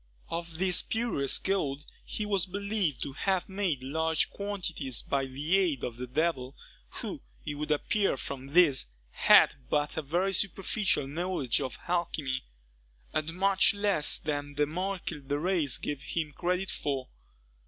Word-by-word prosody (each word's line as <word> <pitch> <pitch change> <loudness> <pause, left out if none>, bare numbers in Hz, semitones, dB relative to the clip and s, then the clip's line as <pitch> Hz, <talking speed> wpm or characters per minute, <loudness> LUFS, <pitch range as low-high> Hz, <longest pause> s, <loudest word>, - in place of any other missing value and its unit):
Of 170 -1 -4
this 185 0 +3
spurious 220 - +1
gold 150 -7 -1 0.2
he 215 - -4
was 200 -2 +1
believed 200 -5 -1
to 140 - -5
have 190 +5 0
made 190 -9 -1
large 160 +3 +1
quantities 185 - -3
by 135 -1 0
the 145 +7 0
aid 165 -9 +1
of 120 -1 -3
the 125 +1 -5
devil, 135 -1 0 0.3
who, - - -5 0.2
it - - -2
would 150 +1 -4
appear 195 +3 +1
from 135 0 -6
this, 145 - +5 0.2
had - - +6 0.2
but 150 +1 0
a - - +1
very 175 +7 0
superficial 195 -3 +1
knowledge 155 -5 -1
of 130 -3 -4
alchymy, 160 -7 -1 0.7
and 155 +2 -2
much 195 +1 +4
less 200 -7 +3
than 145 -1 -3
the 150 +1 +3
Maréchal 170 -3 -4
de 145 +1 0
Rays 165 -4 +1
gave 145 -2 -4
him 155 +3 -2
credit 180 +3 -1
for. 135 -3 -2
160 Hz, 150 wpm, -30 LUFS, 140-190 Hz, 0.7 s, had